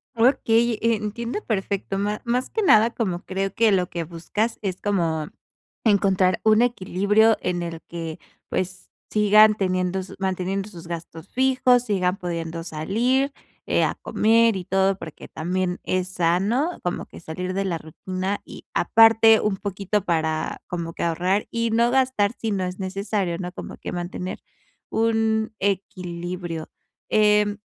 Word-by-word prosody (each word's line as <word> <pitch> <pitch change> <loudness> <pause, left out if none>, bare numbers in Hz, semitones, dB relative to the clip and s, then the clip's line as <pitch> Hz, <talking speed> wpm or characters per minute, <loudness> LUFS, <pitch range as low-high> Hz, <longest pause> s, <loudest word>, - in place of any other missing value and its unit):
Okey, 235 -1 +3
eh, 230 0 +3
entiendo 220 - -4
perfecto. 195 -2 -2
Ma 205 +1 -1
más 245 +2 0
que 445 - -1
nada, 225 - +6
como 185 -6 -2
creo 195 0 -2
que 225 0 +3
lo 185 -2 +2
que 170 -1 -3
buscas 175 +8 -3
es 190 -3 -3
como, 165 -6 0 0.6
encontrar 195 -3 +3
un 220 +1 +5
equilibrio 215 -1 +3
en 180 -1 -1
el 170 -1 -5
que, 165 -2 -6 0.3
pues, 185 0 -3 0.2
sigan 215 0 +6
teniendo 185 -2 -1
su 185 - -10
manteniendo 190 +1 -2
sus 175 -5 -11
gastos 165 -1 -7
fijos, 255 -1 +3
sigan 185 -3 0
pudiendo 165 -3 -4
salir, 230 - 0 0.4
eh, - - +2
a - - +1
comer 225 0 +3
y 185 -2 -4
todo. 190 +1 +2
Porque 160 -5 -10
también 180 +2 -2
es 185 0 -1
sano, 195 - 0
como 175 - -2
que - - -13
salir 180 +3 -5
de 195 +1 0
la 175 -3 -1
rutina 185 +5 -4
y - - -11
aparte 225 0 +6
un 210 -2 0
poquito 200 +1 -2
para, 160 -3 -1
como 170 -1 -5
que - - -4
ahorrar 180 +5 +1
y 230 0 0
no 235 +2 +3
gastar 255 -6 +2
si 225 - -3
no 195 -2 -1
es 180 +1 -4
necesario, 195 -2 -2
¿no?, 180 0 -5
como - - -8
que - - -6
mantener 180 +1 -5 0.5
un 220 -1 +1
equilibrio, 180 -3 -3 0.4
em 210 -1 +3
195 Hz, 150 wpm, -23 LUFS, 180-220 Hz, 0.6 s, nada